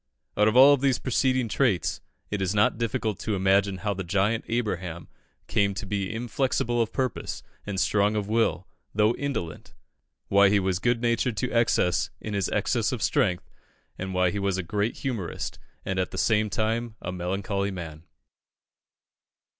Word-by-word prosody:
Out 105 - +4
of 110 - +2
all 135 +3 +9
these 135 -2 +2
preceding 130 -1 +1
traits, 110 -4 0 0.3
it 105 -1 -2
is 95 +1 0
not 105 +2 +3
difficult 115 -3 -1
to 110 - -2
imagine 95 0 +2
how 100 +2 -2
the 95 0 -4
giant 100 +5 +1
Abraham 95 -8 -3 0.4
came 100 -3 +1
to 100 - -5
be 100 -1 -2
inflexible 120 0 0
of 115 - -1
purpose 130 -4 -3 0.2
and 100 -2 -2
strong 105 +2 +2
of 105 -2 -1
will, 115 +1 +1 0.3
though 105 +2 +4
indolent 135 - -5 0.5
why 100 0 +5
he 100 0 +3
was 95 -2 0
good 120 +3 +1
natured 115 -1 +1
to 125 - -1
excess 115 -7 +2
in 105 - -6
his 100 -2 0
excess - - 0
of - - -3
strength 90 -1 +1 0.5
and 95 +1 -5
why 90 -1 +3
he 100 - -3
was 100 -1 0
a 95 - -2
great 105 +6 -1
humourist, 115 -10 -4 0.3
and 95 -1 -1
at 90 - 0
the - - -8
same 110 -1 +2
time 110 +3 -1
a 90 - -5
melancholy 95 +2 -2
man. 85 -5 -7
105 Hz, 170 wpm, -26 LUFS, 95-115 Hz, 0.5 s, all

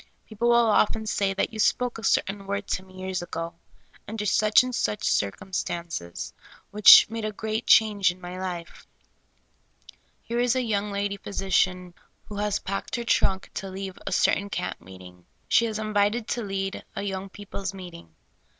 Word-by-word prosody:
People 235 +2 -1
will 240 - +5
often 220 -1 +3
say 200 -2 0
that 195 +4 -1
you 220 - -7
spoke 245 +2 +1
a - - -11
certain 195 -1 0
word 200 0 -2
to - - -1
me 185 0 -16
years 185 -1 -3
ago, 165 -1 -5 0.5
under 215 0 -4
such 215 +3 +4
and 255 0 -4
such 105 - -1
circumstances, 165 - -3 0.4
which 210 0 +9
made 225 0 -5
a 215 - -2
great 220 +2 -4
change 210 -4 +5
in 180 +1 -6
my 180 0 -7
life. 175 -2 -6 1.4
Here 235 +1 -2
is 245 0 +2
a 255 - +1
young 210 -2 -1
lady 200 0 -2
phj^si 195 -2 -5
cian 180 -2 +2 0.3
who 205 - -8
has 210 0 0
packed 195 +5 -4
her 240 - -3
trunk 195 -4 +1
to 195 - -5
leave 190 0 -7
a - - -2
certain 200 +1 +2
camp - - -4
meeting. 90 0 -14 0.2
She 230 - +4
is 220 -1 -3
invited 215 +1 0
to 240 - -1
lead 195 -2 -3
a - - -3
3'Oung 195 -1 -4
people's 200 -1 -6
meeting. 170 - -11
200 Hz, 175 wpm, -26 LUFS, 185-215 Hz, 1.4 s, which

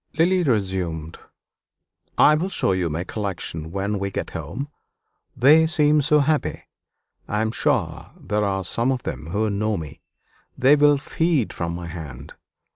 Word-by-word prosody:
Lily 180 +3 +3
resumed 95 - -2 1.0
"I 150 - +6
will 165 +5 0
show 145 - 0
you 90 -2 0
my 80 +3 -3
collection 90 -6 -4
when 100 +2 -2
we 100 0 -2
get - - -5
home 140 - -5 0.7
they 150 +6 +6
seem 150 -1 +3
so 150 +1 +3
happy. 150 +1 0 0.6
I 105 +1 -1
am 110 - -1
sure - - -1
there 105 +1 -1
are 95 -1 -1
some 115 +8 0
of 130 -2 -3
them 75 - -5
who 105 +6 0
know 105 +1 -1
me 75 -4 -8 0.6
they 135 +3 +5
will 145 0 +5
feed 155 -2 0
from 85 0 -3
my 85 0 -6
hand. 80 -7 -8
105 Hz, 155 wpm, -23 LUFS, 90-145 Hz, 1.0 s, I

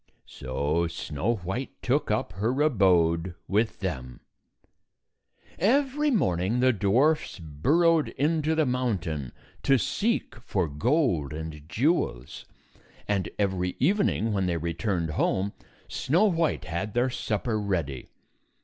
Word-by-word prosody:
So 75 +6 -1
Snow 85 +8 -2
White 100 +7 -5
took 145 +4 +1
up 105 -3 -1
her 110 +9 -1
abode 90 - +3
with 110 +2 0
them. 65 -10 -4 1.4
Every 275 - +2
morning 100 - +1
the 130 0 +4
dwarfs 120 +10 +2
burrowed 150 - +2
into 155 +2 0
the 160 -1 +2
mountain 100 - -2 0.3
to 135 - +4
seek 215 - -1
for 100 -7 -1
gold 85 - +1
and 80 -1 -7
jewels, 105 - -1 0.6
and 100 -2 0
every 95 -3 0
evening, 150 - +2
when 95 -2 0
they 85 -1 0
returned 85 +1 -2
home, 95 +6 0 0.3
Snow 170 +9 +1
White 165 - +1
had 85 +7 -4
their 125 +1 +2
supper 110 0 -1
ready. 85 -10 -2
100 Hz, 115 wpm, -27 LUFS, 85-135 Hz, 1.4 s, the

